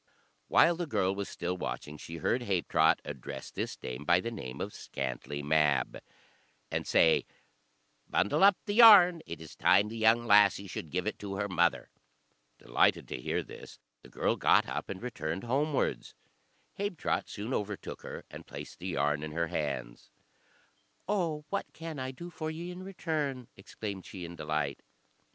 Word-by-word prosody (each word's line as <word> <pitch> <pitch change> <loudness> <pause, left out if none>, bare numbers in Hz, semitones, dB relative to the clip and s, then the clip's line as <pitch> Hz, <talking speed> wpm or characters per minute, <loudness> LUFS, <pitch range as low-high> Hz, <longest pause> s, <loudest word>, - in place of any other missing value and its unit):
While 170 0 +5
the 175 -1 -3
girl 95 -9 +1
was 100 0 -4
still 90 +1 -3
watching, 75 -4 -5
she 80 +2 -8
heard 120 - 0
Habetrot 95 -7 +2
address - - -7
this - - -4
dame 65 +3 -6
by 85 +3 +4
the 115 +5 -4
name 65 - -7
of - - -4
Scantlie 70 +2 -5
Mab, 75 -1 +2 0.7
and - - -2
say, 80 -1 +4 0.8
"Bundle 100 - +2
up 200 -1 +7
the 205 - -2
yarn, 200 -7 +9
it 85 - -6
is 80 -1 -11
time 105 +1 +4
the 115 - -7
young 115 +1 +4
lassie 100 -2 +5
should 85 -4 -6
give 90 +3 -2
it 110 - -3
to 100 -1 -5
her 100 +1 -1
mother." 85 -2 +1 0.7
Delighted - - +2
to - - -5
hear - - -1
this, - - -12 0.2
the - - -15
girl - - 0
got - - +4
up - - -4
and 95 +3 -6
returned 85 -8 -4
homewards. 140 +4 -1 0.6
Habetrot 200 -6 -1
soon 110 +5 -5
overtook 105 -3 -4
her, - - -8
and - - -10
placed - - -9
the - - -6
yarn 75 +1 0
in 75 0 -5
her 85 0 -1
hands. 70 -6 -4 1.0
"Oh, 170 -7 -1
what 200 - -3
can 165 -3 -7
I 130 0 -3
do 170 +7 -8
for 155 -1 -4
ye 170 +3 -5
in 180 +1 -8
return?" 155 -9 -3
exclaimed 100 -1 -7
she, 90 -3 -7
in 85 +1 -8
delight. 75 -3 -2
100 Hz, 170 wpm, -31 LUFS, -, 1.0 s, yarn